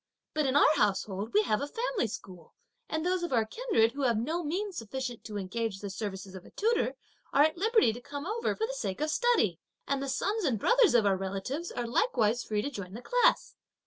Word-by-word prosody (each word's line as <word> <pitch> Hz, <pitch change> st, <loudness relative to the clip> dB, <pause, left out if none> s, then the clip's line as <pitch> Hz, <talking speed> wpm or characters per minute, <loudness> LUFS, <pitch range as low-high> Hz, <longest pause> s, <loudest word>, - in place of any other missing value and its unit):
But 305 Hz, -2 st, +1 dB
in 260 Hz, -, 0 dB
our 300 Hz, +1 st, +6 dB
household, 200 Hz, 0 st, 0 dB
we 210 Hz, 0 st, +4 dB
have 215 Hz, +1 st, 0 dB
a 285 Hz, -, -2 dB
family 460 Hz, -, -1 dB
school, 180 Hz, -5 st, -10 dB, 0.3 s
and 315 Hz, +1 st, -2 dB
those 365 Hz, 0 st, +1 dB
of 345 Hz, -, -3 dB
our 230 Hz, -3 st, +3 dB
kindred 230 Hz, -, +1 dB
who 280 Hz, -, -6 dB
have 240 Hz, -4 st, +2 dB
no 315 Hz, +10 st, -1 dB
means 375 Hz, +6 st, -2 dB
sufficient 245 Hz, +2 st, -5 dB
to 210 Hz, -2 st, -5 dB
engage 205 Hz, +2 st, -3 dB
the 200 Hz, -1 st, -5 dB
services 190 Hz, -1 st, -5 dB
of 190 Hz, -2 st, -9 dB
a -, -, -14 dB
tutor 460 Hz, +3 st, 0 dB, 0.4 s
are 285 Hz, -, +5 dB
at 310 Hz, 0 st, +2 dB
liberty 430 Hz, -, +3 dB
to 240 Hz, -, -9 dB
come 285 Hz, +2 st, -6 dB
over 445 Hz, +5 st, -1 dB
for 445 Hz, -, -1 dB
the -, -, -5 dB
sake 195 Hz, -, -3 dB
of 305 Hz, +1 st, 0 dB
study, 435 Hz, -, +2 dB, 0.3 s
and 280 Hz, -1 st, 0 dB
the 275 Hz, -, -3 dB
sons 410 Hz, +10 st, -1 dB
and 260 Hz, -9 st, +1 dB
brothers 475 Hz, -, +4 dB
of 225 Hz, -3 st, +5 dB
our 195 Hz, -1 st, +3 dB
relatives 195 Hz, -, -4 dB
are 245 Hz, -, -3 dB
likewise 235 Hz, -, +1 dB
free 210 Hz, -1 st, -1 dB
to 285 Hz, -, -3 dB
join 200 Hz, -6 st, -7 dB
the 240 Hz, -, -8 dB
class. -, -, +2 dB
260 Hz, 225 wpm, -30 LUFS, -, 0.4 s, our